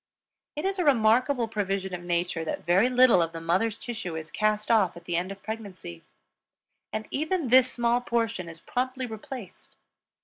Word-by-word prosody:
It 300 - -3
is 390 0 -1
a - - +2
remarkable 245 -1 +3
provision 195 -3 -2
of 180 - -4
Nature 175 -1 -1
that 160 - -4
very 190 +8 +4
little 250 -7 +6
of 165 0 -1
the 165 - -5
mother's 185 +7 0
tissue 225 -9 -5
is 155 -1 -6
cast 215 +1 0
off 195 -6 +3
at 170 - -13
the 175 - -2
end 180 +3 -1
of 195 0 -10
pregnancy; 200 - -7 0.9
and 215 0 -3
even 315 0 -1
this 255 +1 +6
small 240 0 +1
portion 230 -7 -1
is 165 0 -10
promptly 255 +6 -2
replaced. 225 -3 -9
215 Hz, 175 wpm, -27 LUFS, 180-245 Hz, 0.9 s, little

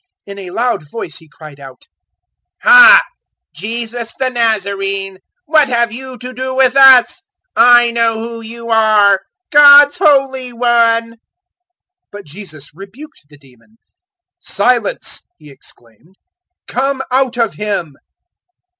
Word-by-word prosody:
In 200 0 -11
a 185 -2 -10
loud 230 -7 -4
voice 225 -2 -9
he 160 -2 -21
cried 155 -2 -15
out, 135 -2 -14 0.8
004:034 - - +3
"Ha! - - +8 0.5
Jesus 230 +6 -6
the 260 -1 -2
Nazarene, 195 -4 -3 0.3
what 305 -2 +2
have 235 -2 0
you 260 +2 -9
to 250 +1 -10
do 260 +1 -6
with 260 -1 +1
us? 270 +5 +5 0.3
I 240 0 +4
know 230 -1 -1
who 230 +1 -8
you 230 +1 -9
are 210 -3 +2 0.3
God's 290 +2 +6
Holy 270 -6 0
One!" 230 -1 0
004:035 230 - -20 0.9
But 205 0 -12
Jesus 155 -3 -12
rebuked 195 - -15
the 145 - -18
demon. 135 - -25 0.6
"Silence!" 250 - -2 0.2
He 150 - -17
exclaimed; 125 - -20 0.5
"come 270 +1 -3
out 260 -1 -1
of 230 -3 -1
him." 200 -8 -5
230 Hz, 130 wpm, -13 LUFS, 195-255 Hz, 0.9 s, Ha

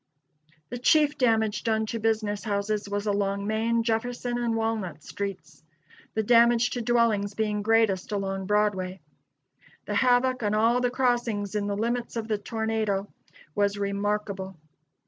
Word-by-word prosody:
The 245 - -5
chief 295 +4 +4
damage 220 -4 +1
done 220 -1 +1
to 230 +1 -4
business 215 -2 0
houses 205 -1 -2
was 205 +1 -2
along 200 -1 0
Main, 225 +2 +1
Jefferson 240 +1 -1
and 235 -1 0
Walnut 220 -9 -2
streets; 170 -8 -6 0.5
the 220 - +1
damage 235 +1 +4
to 245 - -2
dwellings 220 -4 +1
being 210 -1 -1
greatest 220 -3 +2
along 195 -2 -2
Broadway. 195 -3 0 0.9
The - - -3
havoc 255 0 +3
on 210 -1 0
all 230 +3 +3
the 245 - +2
crossings 240 -5 0
in 205 -1 -1
the 200 0 -2
limits 235 +3 -2
of 225 -1 -3
the 215 -2 -1
tornado 220 -2 -2 0.4
was 205 +2 +1
remarkable. 200 -1 -2
215 Hz, 145 wpm, -26 LUFS, 200-235 Hz, 0.9 s, chief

